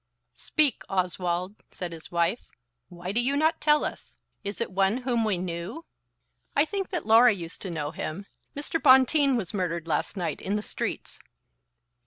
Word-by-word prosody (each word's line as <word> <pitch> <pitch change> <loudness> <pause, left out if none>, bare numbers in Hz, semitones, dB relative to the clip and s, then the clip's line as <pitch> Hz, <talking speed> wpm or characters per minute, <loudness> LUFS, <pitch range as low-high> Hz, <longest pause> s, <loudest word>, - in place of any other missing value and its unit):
"Speak, 300 -5 +2
Oswald," 180 +1 -1
said 180 -2 -6
his 165 -1 -9
wife. 170 +6 0 0.4
"Why 175 +1 -6
do 225 - +2
you 275 +3 +1
not 315 +2 +2
tell 300 0 +4
us? - - -7 0.3
Is 200 0 -4
it 235 - -2
one 195 +4 +2
whom 240 -3 +1
we 210 -4 +1
knew?" 180 - -5 0.7
"I 285 - +5
think 390 +3 -3
that 355 -4 -3
Laura 225 +2 +7
used 170 -3 -7
to 190 - -5
know 150 -3 -3
him. 165 +4 -5 0.3
Mr. 295 +3 -2
Bonteen 265 +1 +6
was 195 -5 -4
murdered 170 -4 -2
last 160 +5 -1
night 175 - -3
in 200 - -1
the 210 - -2
streets." - - -4
200 Hz, 170 wpm, -27 LUFS, 175-265 Hz, 0.7 s, Laura